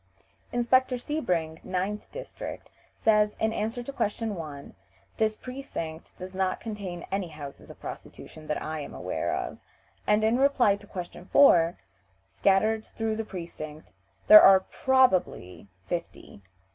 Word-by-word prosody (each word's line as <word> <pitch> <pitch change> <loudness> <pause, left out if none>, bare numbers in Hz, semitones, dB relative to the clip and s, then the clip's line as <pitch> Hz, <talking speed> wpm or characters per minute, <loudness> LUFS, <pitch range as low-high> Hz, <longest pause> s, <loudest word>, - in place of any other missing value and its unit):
Inspector 255 +2 +2
Sebring, 180 - -2
9th 190 +3 -3
district, - - -8 0.3
says, 210 -1 +4
in 220 0 +1
answer 225 +4 -2
to 275 - -7
question 220 -2 -1
1, 150 -6 -8 0.4
"This 215 -1 +1
precinct 250 - -7
does 185 +1 -8
not 185 0 -1
contain 200 -6 -6
any 195 -2 -1
houses 150 -3 -10
of - - -12
prostitution 155 -1 -10
that 150 - -1
I 155 0 -4
am 145 - -7
aware - - -2
of;" - - -5 0.5
and 210 +1 +3
in 225 +3 +3
reply 270 -7 +4
to 205 - -16
question 180 -1 -7
4: 175 -8 +5 0.5
"Scattered 200 - +2
through 225 -1 -2
the 225 - -2
precinct 165 -6 -8 0.3
there 210 0 +11
are 190 0 +8
probably 190 - +1 0.2
fifty." 170 -11 -6
200 Hz, 135 wpm, -27 LUFS, 170-225 Hz, 0.5 s, there